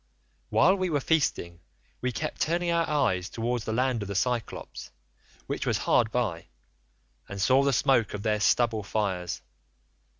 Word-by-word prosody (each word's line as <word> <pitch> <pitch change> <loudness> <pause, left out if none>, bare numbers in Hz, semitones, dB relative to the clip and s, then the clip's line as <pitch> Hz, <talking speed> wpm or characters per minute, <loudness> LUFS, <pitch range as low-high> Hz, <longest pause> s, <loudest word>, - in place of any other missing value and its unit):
While 190 +2 +4
we 185 -1 -1
were 150 -3 +1
feasting 130 - 0 0.4
we 125 - -1
kept 155 +5 -4
turning 170 +2 +1
our 170 -1 +1
eyes 95 -12 +1
towards 120 0 -2
the - - -2
land 125 0 0
of 100 - -4
the 100 - -5
Cyclopes, 120 +2 -3 0.6
which - - -3
was - - +2
hard 110 -2 +2
by, 100 -10 -2 0.8
and 100 - -6
saw 130 +7 +4
the 140 0 +2
smoke 130 -6 +2
of 100 - -6
their 105 -1 +1
stubble 110 +1 +2
fires. 100 -4 -2
120 Hz, 160 wpm, -27 LUFS, 100-140 Hz, 0.8 s, While